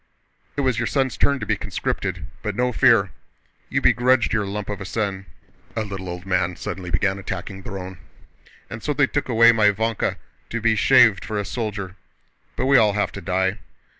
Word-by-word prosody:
"It - - +1
was 130 -4 +1
your 120 - 0
son's 135 -3 0
turn 140 -1 +1
to 110 - -4
be - - +1
conscripted, - - -3 0.2
but 105 -2 -3
no 125 +2 +1
fear! - - +4 0.6
You - - 0
begrudged 125 -1 +3
your 105 -2 0
lump 105 +1 -4
of 100 -1 -5
a - - -3
son," 95 -1 -3 0.5
a 110 - -1
little 95 -3 -6
old 90 +1 -7
man 90 -2 0
suddenly 90 +1 -6
began 95 +3 0
attacking 95 +1 -6
Dron—"and 95 +3 -11
so 150 - -1
they 145 0 +3
took 145 0 -3
my 120 - -1 0.3
Vánka 110 +2 -1 0.3
to 115 - -3
be 110 0 +2
shaved 120 -4 +5
for 110 - -4
a 105 - -3
soldier! 100 -4 -4 0.6
But - - -1
we 135 0 +5
all 105 -3 +4
have 105 0 0
to 100 - -8
die." 95 +3 0
105 Hz, 185 wpm, -22 LUFS, 95-115 Hz, 0.6 s, shaved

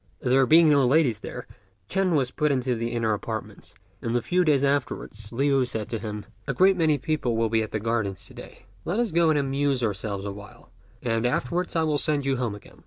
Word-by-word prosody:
There 130 +1 +3
being 165 +1 +6
no 145 -2 +5
ladies 130 -4 +3
there, - - -7 0.4
Ch'ên 190 -3 +1
was 135 -3 +1
put 150 -1 0
into 130 -2 0
the 115 0 -2
inner 115 -2 0
apartments; 105 -2 -6 0.3
and 115 0 -2
a 120 - +2
few 180 0 +2
days 145 -4 +3
afterwards 130 -6 -2
Liu 135 +2 +2
said 110 -3 -4
to 115 -2 -3
him, 105 -1 -6 0.2
"A - - -2
great 190 +1 +5
many 160 -4 +2
people 135 -4 -1
will 115 -1 +1
be 110 0 +2
at 110 - -3
the 110 - -3
gardens 105 -4 -2
to - - -13
day; - - -12 0.2
let 185 +7 -2
us 240 -4 0
go 165 0 +3
and 155 - +3
amuse 140 -2 0
ourselves 100 -1 -3
awhile, 100 -1 -10 0.3
and 115 -2 0
afterwards 150 +9 -1
I 165 - +2
will 150 -2 +1
send 145 -2 0
you 135 -1 +1
home 120 -5 -2
again." 105 - -15
130 Hz, 220 wpm, -25 LUFS, 110-150 Hz, 0.4 s, being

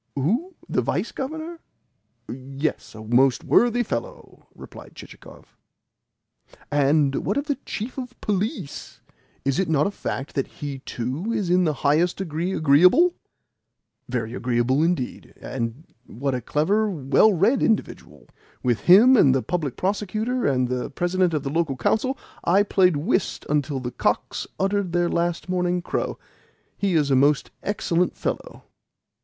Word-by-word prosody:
"Who? 230 - -1
The - - 0
Vice - - -2
Governor? 315 +5 -5 0.7
Yes, 135 +2 -4
a 110 - -9
most 125 +3 +3
worthy 240 0 +3
fellow!" 120 - -6
replied - - -12
Chichikov. - - -14 1.2
"And 145 -1 +2
what 200 - -1
of 285 - -1
the 285 -3 -2
Chief 235 +5 -5
of 245 -1 -8
Police? 200 -6 -4 0.4
Is 135 +4 +1
it 190 -4 0
not 150 -2 +2
a 200 - -1
fact 140 -7 -5
that 135 - -1
he 140 -2 -7
too 130 - -4
is 205 -6 -1
in 180 0 +4
the 155 - +1
highest 160 +5 +3
degree 175 -1 -3
agreeable?" 180 - +5 1.0
"Very 115 -2 -3
agreeable 125 +3 +1
indeed. 165 -6 -2
And 120 +3 -5 0.2
what 135 +4 -3
a 125 - -2
clever, 200 - +1
well 160 +5 +3
read 205 +8 +2
individual! 220 -2 -2 0.4
With 120 -3 +1
him 230 +9 +8
and 135 - +5
the 130 - 0
Public 155 -8 -2
Prosecutor 215 +6 -1
and 130 -2 +1
the 125 0 -3
President 175 +2 0
of 145 - -2
the 135 - -3
Local 155 -4 0
Council 260 - 0 0.3
I 195 +4 +4
played 185 -5 +3
whist 185 +5 -1
until 145 -2 0
the 125 -1 -5
cocks - - -1
uttered 195 -2 0
their 175 0 +2
last 170 +1 -1
morning 180 -1 0
crow. - - -2 0.6
He 195 -3 0
is 145 -3 +2
a - - +5
most 140 +2 +2
excellent 180 -3 -1
fellow." - - -4
170 Hz, 150 wpm, -23 LUFS, 135-205 Hz, 1.2 s, him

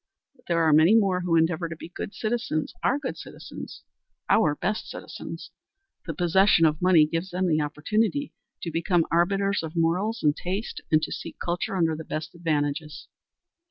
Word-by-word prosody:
But 250 - -28
there 170 -1 +2
are 160 -1 +4
many 160 +8 +6
more 195 -5 +3
who 175 -2 +1
endeavor 165 +1 +1
to 165 - -5
be 165 - -10
good 200 - -7
citizens 215 -8 -2
are 270 - +2
good 280 -3 -5
citizens, - - -9 0.5
our 155 -10 +4
best 210 +7 -2
citizens. - - -8 0.6
The - - -4
possession 175 0 +4
of 155 -1 +1
money 175 -4 +6
gives 165 +4 -3
them 185 +1 -1
the 155 -2 +2
opportunity 215 - -1 0.3
to 170 - -3
become 170 +1 +1
arbiters 195 +4 +2
of 160 0 -7
morals 180 +7 0
and 150 -1 +3
taste, 190 +7 -4
and 155 0 +4
to - - -3
seek - - -6
culture 175 +2 -2
under 165 -3 +2
the 160 - -7
best 155 0 -5
advantages. 155 -2 -2
170 Hz, 175 wpm, -26 LUFS, 160-195 Hz, 0.6 s, many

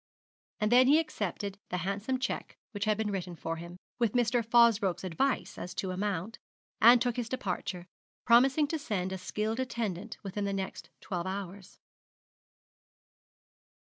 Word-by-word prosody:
And 210 +1 +1
then 250 +1 +7
he 290 +3 +7
accepted 200 - -3
the 180 - -1
handsome 200 +7 -1
cheque 265 +1 -4
which 205 -1 -3
had 215 -1 +2
been 215 -1 -1
written 180 -3 -4
for 165 0 -4
him, 170 +2 -9 0.2
with 235 -4 +2
Mr. 240 -1 +2
Fosbroke's 225 -5 +4
advice 220 +10 -1
as 180 - -6
to 190 - -2
amount, 195 +2 -3 0.4
and 240 +2 +9
took 245 -1 0
his 235 -2 -2
departure, 180 -6 -3 0.4
promising 265 +5 +5
to 320 - -1
send 190 -9 -2
a 190 - -4
skilled 215 +5 -2
attendant 225 -5 -3
within 200 +1 -3
the 200 - -1
next 190 -1 -5
twelve 180 -1 -3
hours. 195 0 -6
210 Hz, 150 wpm, -30 LUFS, 190-240 Hz, 0.4 s, and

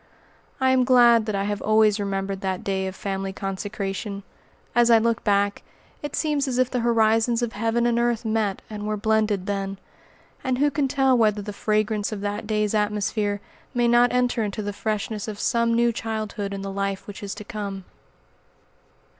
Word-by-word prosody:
I 260 0 +3
am 260 -1 +4
glad 240 -3 +5
that 215 - -1
I 195 - 0
have 205 0 -2
always 215 -1 +3
remembered 195 -1 -2
that 190 -1 -2
day 190 -1 -1
of 190 - -6
family 195 -1 -3
consecration. 195 +1 -4 0.5
As 240 0 +4
I 230 - +8
look 230 0 +1
back, 200 -1 +1 0.4
it 295 - -4
seems 295 -3 0
as 250 -2 -1
if 255 0 +2
the 250 - 0
horizons 230 0 +2
of 235 - -2
heaven 225 +3 0
and 235 0 +2
earth 240 -1 0
met 215 -3 -1
and 210 -1 -6
were 215 0 -1
blended 215 -2 +1
then. 195 -1 -3 0.7
And 255 -2 0
who 290 +2 +2
can 280 0 +1
tell 265 -1 +3
whether 215 -3 +2
the 210 0 -6
fragrance 215 0 0
of 210 -2 -5
that 205 +1 -3
day's 210 -1 0
atmosphere 210 -1 0 0.3
may 240 -1 +3
not 240 +1 +5
enter 250 -1 +1
into 210 0 -3
the 205 0 -3
freshness 215 0 -3
of 210 -2 -5
some 235 -1 +1
new 235 0 +3
childhood 215 -2 -4
in 195 0 -5
the 195 - -4
life 195 0 -3
which 205 - -9
is 200 -1 -5
to 210 - -8
come? 200 -2 -5
215 Hz, 190 wpm, -24 LUFS, 200-235 Hz, 0.7 s, I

